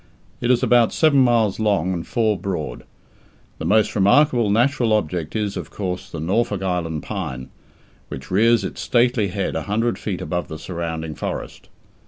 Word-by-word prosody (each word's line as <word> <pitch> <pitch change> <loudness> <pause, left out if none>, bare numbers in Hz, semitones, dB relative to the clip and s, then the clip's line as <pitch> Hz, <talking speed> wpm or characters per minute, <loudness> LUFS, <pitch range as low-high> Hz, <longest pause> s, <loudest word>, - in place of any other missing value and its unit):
It 120 - -1
is 125 -1 +3
about 120 -2 +4
seven 155 -4 +3
miles 115 -6 +3
long 100 -4 +1
and 85 -2 -5
four 110 -3 +1
broad. 95 -1 -5 0.7
The - - -4
most 110 0 +3
remarkable 120 +3 +4
natural 120 +1 +2
object 90 -5 -1
is, 105 -2 -1
of - - -6
course, 95 -3 -5
the 80 - -6
Norfolk 95 +4 0
Island 85 -5 -2
pine, 65 0 -5 0.6
which 65 +4 -9
rears 115 +3 +4
its - - -5
stately 120 -3 +2
head 95 +1 -3
a - - -1
hundred 115 +3 0
feet 95 -4 -3
above 90 -3 -3
the 80 - -7
surrounding 80 -1 -5
forest. - - -6
100 Hz, 165 wpm, -21 LUFS, 90-115 Hz, 0.7 s, about